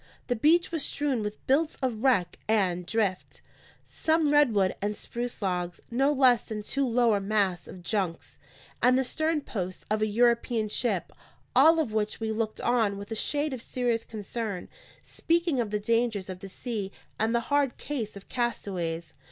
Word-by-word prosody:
The 245 - 0
beach 325 +10 +3
was 325 -4 -1
strewn 280 -5 0
with 210 0 -5
bits 300 +4 +2
of 240 -5 -2
wreck 225 -10 +2
and 185 -5 +1
drift: 205 -4 -1 0.4
some 315 -2 +1
redwood 225 -10 +4
and 205 +1 -1
spruce 240 -2 -5
logs, 180 -2 -2
no 270 +4 +3
less 260 -4 +5
than 210 -1 -6
two 275 +5 0
lower 235 -3 +3
masts 195 -3 0
of 180 - -10
junks, 190 -5 -3 0.4
and 250 +1 +5
the 265 - +2
stern 315 +4 0
post 185 -8 -5
of 215 0 +1
a 215 - +3
European 235 0 +2
ship; 210 -4 -1 0.4
all 325 +1 +7
of 275 -9 -1
which 215 -1 -1
we 220 -1 -2
looked 220 0 -2
on 225 -5 +2
with 200 +2 -9
a - - -1
shade 290 +6 0
of 255 - -5
serious 240 -2 -1
concern, 210 -2 -5 0.3
speaking 335 -4 0
of 225 - -3
the 210 0 -1
dangers 220 -3 0
of 180 - -8
the 195 0 -8
sea 210 -2 -4 0.3
and 220 +2 +1
the - - +4
hard 285 -3 +2
case 235 -9 -4
of 195 - -13
castaways. 185 -9 -3
225 Hz, 175 wpm, -28 LUFS, 200-260 Hz, 0.4 s, all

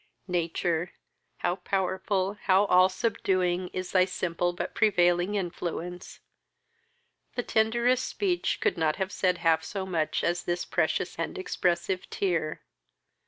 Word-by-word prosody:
Nature, 175 -1 -1 0.4
how 175 +1 -1
powerful, 190 +1 -1
how 195 +1 +5
all 185 -1 +5
subduing, 185 -3 0
is 185 0 -5
thy 185 -1 +5
simple 175 -1 -1
but 175 - -5
prevailing 175 -2 +3
influence! 175 -1 -4 1.1
The 245 - -1
tenderest 235 +4 +2
speech 365 -4 0
could 415 -3 +1
not 155 -1 +2
have 190 +1 -2
said 180 -1 +1
half 165 -1 +2
so 195 -2 -4
much 165 -5 -1
as 175 +1 0
this 175 0 -1
precious - - -1
and - - -3
expressive 180 - -1
tear. 170 -5 -1
185 Hz, 125 wpm, -28 LUFS, 175-195 Hz, 1.1 s, how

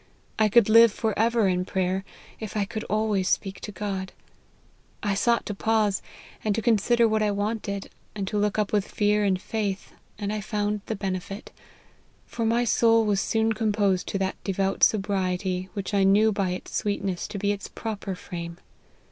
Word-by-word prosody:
I 215 -1 +4
could 235 0 +5
live 230 +1 +7
for 220 +1 -1
ever 230 -1 +3
in 180 -1 +1
prayer, 185 0 -1 0.4
if 220 -1 -5
I 205 - +1
could 215 +1 -5
always 210 -3 0
speak 195 -1 -1
to 210 - -7
God. 195 -1 -4 0.9
I 205 -2 +1
sought 235 +4 +2
to 205 - -3
pause, 215 -1 +1 0.4
and 210 -2 +1
to 225 - -1
consider 235 +1 +3
what 215 0 +1
I 210 - +2
wanted, 205 -1 -3 0.2
and 200 -2 -3
to 210 - -1
look 210 0 0
up 210 -1 0
with 205 -2 +2
fear 210 0 +1
and 190 -2 +2
faith, 200 -2 -3 0.3
and 205 0 -3
I 215 - -2
found 210 0 -1
the 220 - -2
benefit; 195 0 -5 0.7
for 230 - -3
my 235 +2 +2
soul 230 -1 +4
was 200 -2 +2
soon 225 0 +1
com 215 -1 0
posed 200 -3 +1
to - - -2
that 190 0 -3
devout 195 0 -1
sobriety 190 -2 +1
which 200 +1 -4
I 200 -1 +3
knew 205 +3 +5
by 195 -3 0
its 180 +1 -5
sweetness 195 -3 -1
to 210 - -6
be 200 +1 +1
its 200 -1 -4
proper 205 -4 -5
frame. 170 -2 -7
205 Hz, 185 wpm, -26 LUFS, 195-220 Hz, 0.9 s, live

